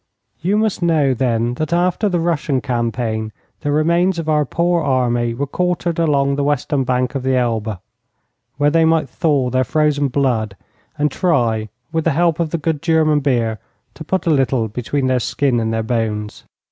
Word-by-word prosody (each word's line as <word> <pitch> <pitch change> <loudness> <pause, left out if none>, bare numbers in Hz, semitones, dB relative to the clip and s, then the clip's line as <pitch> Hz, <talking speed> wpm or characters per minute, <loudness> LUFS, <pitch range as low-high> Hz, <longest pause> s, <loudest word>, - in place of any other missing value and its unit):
You 195 +5 +1
must 215 -3 0
know, 155 -6 +2
then, 120 -2 0
that 155 - -2
after 180 +4 +1
the 175 -2 0
Russian 160 -5 0
campaign 115 -3 -2 0.3
the 145 - -2
remains 170 +4 +2
of 165 -2 -4
our 150 -1 +2
poor 170 +4 +1
army 120 -4 0
were 140 +4 -2
quartered 175 +2 -1
along 140 -4 +2
the 145 - 0
western 145 -1 0
bank 125 0 0
of 135 - -2
the 130 0 +1
Elbe, 115 -4 -1 0.8
where 145 +1 +2
they 165 +1 +3
might 160 -2 +2
thaw 140 -7 0
their 130 +1 +2
frozen 150 +2 +1
blood 120 -6 0 0.4
and 150 0 +1
try, 115 - 0 0.2
with 160 -1 -1
the 165 - +2
help 170 -2 +2
of 165 -2 0
the 170 - -1
good 155 -2 -2
German 160 -2 +3
beer, 120 -6 0 0.3
to 155 - -9
put 190 +5 -2
a 165 - +2
little 130 -5 +1
between 125 +5 -2
their 130 -1 +2
skin 125 0 0
and 110 0 -1
their 115 0 -1
bones. 110 -2 -3
140 Hz, 185 wpm, -18 LUFS, 120-165 Hz, 0.8 s, they